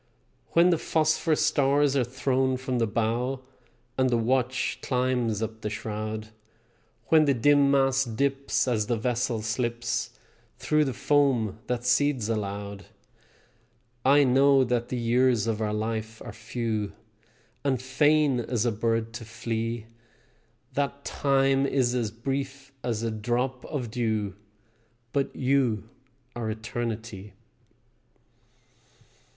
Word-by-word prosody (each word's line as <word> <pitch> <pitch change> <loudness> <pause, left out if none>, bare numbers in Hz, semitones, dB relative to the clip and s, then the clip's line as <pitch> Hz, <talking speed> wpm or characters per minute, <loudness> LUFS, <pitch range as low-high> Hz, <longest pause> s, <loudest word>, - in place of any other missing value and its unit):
When 175 +2 +5
the 170 - +2
phosphor 160 0 +1
stars 140 0 +2
are 135 - +3
thrown 130 +1 0
from 130 -1 -2
the 115 - +2
bow 120 +5 -1 0.6
And 130 0 +3
the 120 - +2
watch 130 +2 0
climbs 125 -4 0
up 110 0 -5
the 105 - -2
shroud; 110 +1 -5 0.8
When 155 -1 +6
the 140 -2 +3
dim 140 +3 +4
mast 135 -3 +2
dips 135 +1 0
as 110 -4 0
the 120 - 0
vessel 120 -1 -1
slips 120 +1 -2 0.4
Thro 150 0 +2
the 135 -5 -2
foam 130 -9 +2
that 125 -1 -2
seethes 125 -3 +2
aloud; 100 -2 -4 1.2
I 140 +2 +6
know 135 +1 +5
that 120 -1 -1
the 125 - -2
years 120 -1 +2
of 110 -1 -1
our 105 -1 0
life 110 +1 -3
are - - -7
few, 110 -2 -3 0.7
And 135 -3 +1
fain 145 +1 +3
as 120 -1 -1
a 120 - +2
bird 115 +1 -1
to 115 +1 -6
flee, 115 0 -3 0.9
That 140 0 -2
time 135 -1 +2
is 130 -3 +1
as 120 -4 0
brief 135 +3 -4
as 115 -2 -2
a 115 - -1
drop 120 +4 -2
of 125 -7 -4
dew 110 -4 -1 0.8
But 140 -1 -1
you 125 -5 +1 0.5
are 115 -2 -3
Eternity. 110 -2 -5
120 Hz, 125 wpm, -27 LUFS, 110-135 Hz, 1.2 s, When